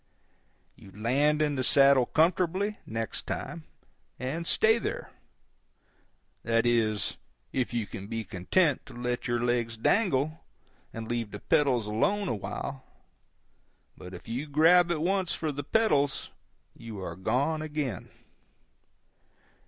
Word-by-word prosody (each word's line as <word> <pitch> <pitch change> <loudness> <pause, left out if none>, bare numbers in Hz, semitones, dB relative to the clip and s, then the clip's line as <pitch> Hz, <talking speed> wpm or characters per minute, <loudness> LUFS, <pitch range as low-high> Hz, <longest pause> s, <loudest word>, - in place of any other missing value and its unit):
You - - -15
land 145 +8 +2
in 150 -1 0
the 130 - 0
saddle 135 -1 +5
comfortably, 185 +5 +1
next 115 -1 -4
time, 165 -2 -5 0.5
and 150 +7 -4
stay 220 +1 +4 1.6
there—that 115 0 +1
is, 110 -4 +1 0.4
if 130 -2 -1
you 120 -3 -1
can 100 0 -8
be 115 0 -3
content 130 - +1
to - - -11
let 120 +1 -3
your 120 0 0
legs 120 -2 0
dangle, 155 - +1 0.5
and 115 0 -6
leave 120 -2 -2
the 105 - -8
pedals 130 -5 +2
alone 200 - 0
a - - 0
while; 130 +6 -5 1.1
but 90 0 -10
if 90 - -12
you 125 +7 -3
grab 165 +4 +5
at 165 -3 0
once 190 +1 +1
for 155 -2 -2
the 145 0 -5
pedals, 145 -6 +1 0.4
you 115 -2 -9
are 90 -3 -5
gone 140 - 0
again. 150 - -4
135 Hz, 130 wpm, -28 LUFS, 115-155 Hz, 1.6 s, saddle